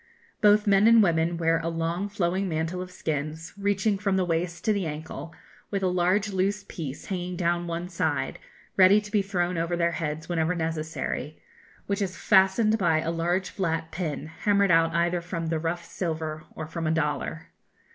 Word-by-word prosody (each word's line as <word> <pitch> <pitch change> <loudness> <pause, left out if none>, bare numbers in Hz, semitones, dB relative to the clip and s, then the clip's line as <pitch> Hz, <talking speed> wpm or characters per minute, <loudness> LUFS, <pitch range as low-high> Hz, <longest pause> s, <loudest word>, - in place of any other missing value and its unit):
Both 210 0 +5
men 200 +1 +5
and 230 -1 +7
women 170 -1 +1
wear 165 0 +2
a 165 0 -2
long 165 +4 -2
flowing 190 0 0
mantle 165 +3 -2
of 185 - -6
skins, 155 -2 -4
reaching 200 0 0
from 195 -2 +1
the 185 - +2
waist 175 +2 -2
to 215 - +4
the 195 -4 -1
ankle, 155 +2 -6 0.4
with 195 -1 -2
a - - +3
large 180 +4 +2
loose 195 +2 0
piece 145 -5 -6
hanging 180 -1 -3
down 175 0 +1
on 175 - -6
one 170 +1 -3
side, 175 -2 -1 0.4
ready 190 +2 +7
to 210 0 -10
be 210 -1 +3
thrown 180 -3 -1
over 170 +1 -1
their 170 0 +2
heads 155 -1 -3
whenever 170 0 0
necessary, 160 -1 -3 0.5
which 200 +1 -1
is 185 -3 -2
fastened 210 +5 +4
by 165 -4 +3
a 165 - -1
large 175 +3 -1
flat 165 -4 -2
pin 155 -5 -3
hammered 200 +4 +1
out 165 0 +4
either 170 +1 +1
from 170 -2 -4
the 160 -1 0
rough 170 +1 -3
silver 160 -3 -4
or 160 - -5
from 160 +1 -4
a - - +2
dollar. 160 +1 -2
175 Hz, 185 wpm, -26 LUFS, 165-190 Hz, 0.5 s, and